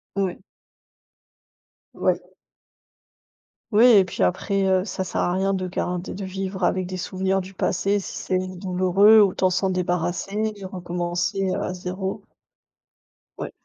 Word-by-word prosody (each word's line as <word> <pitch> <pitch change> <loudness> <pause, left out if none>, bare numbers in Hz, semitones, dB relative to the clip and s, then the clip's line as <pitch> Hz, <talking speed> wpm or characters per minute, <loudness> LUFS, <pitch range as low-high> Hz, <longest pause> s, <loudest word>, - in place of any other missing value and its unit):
Ouais. 190 -2 -1 1.5
Ouais. - - 0 1.5
Oui 225 +4 +6
et 205 -5 +7
puis 175 - -6
après, 195 - +1
heu, 185 -1 +3
ça 190 -2 -3
sert - - -2
à 175 - +1
rien 195 +1 +1
de 185 -1 -2
garder 180 0 -3
de 195 0 -5
vivre 190 0 -4
avec 185 0 +1
des 185 - -5
souvenirs 190 +1 -1
du 190 +1 -8
passé 200 +2 0
si - - -7
c'est 185 0 -2
douloureux. 190 +3 +5
Autant 185 -1 +3
s'en 190 +1 0
débarrasser 180 +4 -1
et 195 - -8
recommencer 180 +1 -2
à 180 - -2
zéro. 185 +2 -4 1.2
Ouais. - - -5
185 Hz, 135 wpm, -23 LUFS, 180-195 Hz, 1.5 s, et